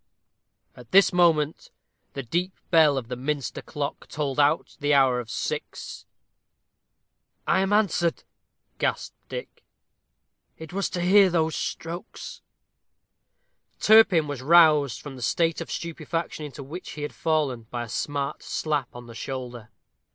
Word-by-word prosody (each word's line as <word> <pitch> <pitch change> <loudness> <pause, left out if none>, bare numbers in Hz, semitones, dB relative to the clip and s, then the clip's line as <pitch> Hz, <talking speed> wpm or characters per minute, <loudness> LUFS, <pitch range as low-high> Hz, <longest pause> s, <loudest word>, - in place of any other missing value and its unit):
At 125 -2 -14
this 195 0 +6
moment 165 -4 +2 0.4
the 135 - -5
deep 175 +9 -2 0.2
bell 155 -4 +5
of 125 -3 -4
the 125 - -4
Minster 140 +2 -3
clock 145 -1 -5
tolled 145 -2 -3
out 145 +2 +2
the 145 -1 +2
hour 130 -3 +4
of 120 -2 -7
six. - - -5 1.4
"I - - +3
am 195 +1 0
answered," 185 -5 +1 0.6
gasped - - -2
Dick; - - -8 0.9
"it 160 +2 -10
was 200 +1 -1
to 175 - -3
hear 195 +2 +6
those 160 -2 0
strokes." 170 +2 -6 1.4
Turpin 200 -8 +6
was 145 -3 -5
roused 150 -4 +5
from 140 -3 -9
the - - -10
state 165 - +1
of 165 - -6
stupefaction 165 -1 -4
into 140 0 -9
which 165 +7 -8
he 150 - -6
had 150 - -4
fallen 145 -8 -1
by 120 -1 -4
a - - -8
smart 140 +4 -3
slap 150 -5 -2
on 120 0 -9
the 115 - -11
shoulder. 125 -3 -6
150 Hz, 140 wpm, -25 LUFS, 135-170 Hz, 1.4 s, this